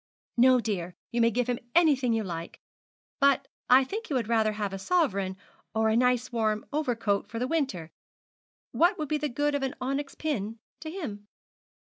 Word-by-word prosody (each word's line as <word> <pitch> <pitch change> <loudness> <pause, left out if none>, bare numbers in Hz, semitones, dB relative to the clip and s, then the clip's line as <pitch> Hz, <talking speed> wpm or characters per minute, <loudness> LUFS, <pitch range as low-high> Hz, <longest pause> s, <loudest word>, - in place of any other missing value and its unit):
'No, 255 +1 +6
dear; 185 -6 -3 0.2
you 235 - +1
may 230 - +5
give 245 +2 0
him 245 -1 -1 0.2
anything 285 -8 +4
you 225 -1 +1
like. 170 -3 -6 0.6
But 280 -1 +3 0.2
I 255 +2 +7
think 430 +12 -5
he 285 - -2
would 235 -4 0
rather 220 -2 +2
have 205 -2 -3
a 195 - -4
sovereign 200 - 0 0.4
or 220 0 +3
a 220 - +2
nice 250 +1 +2
warm 215 -2 0
overcoat 230 -9 0
for 230 - -6
the 250 +2 -1
winter. 260 - -2 0.8
What 350 +4 +3
would 305 -2 -4
be 305 - +1
the 300 0 -1
good 290 +4 0
of 285 - 0
an 270 +1 -2
onyx 275 +2 -3
pin 225 -8 -3 0.2
to 320 0 -6
him?' 235 - -6
245 Hz, 185 wpm, -28 LUFS, 215-285 Hz, 0.8 s, I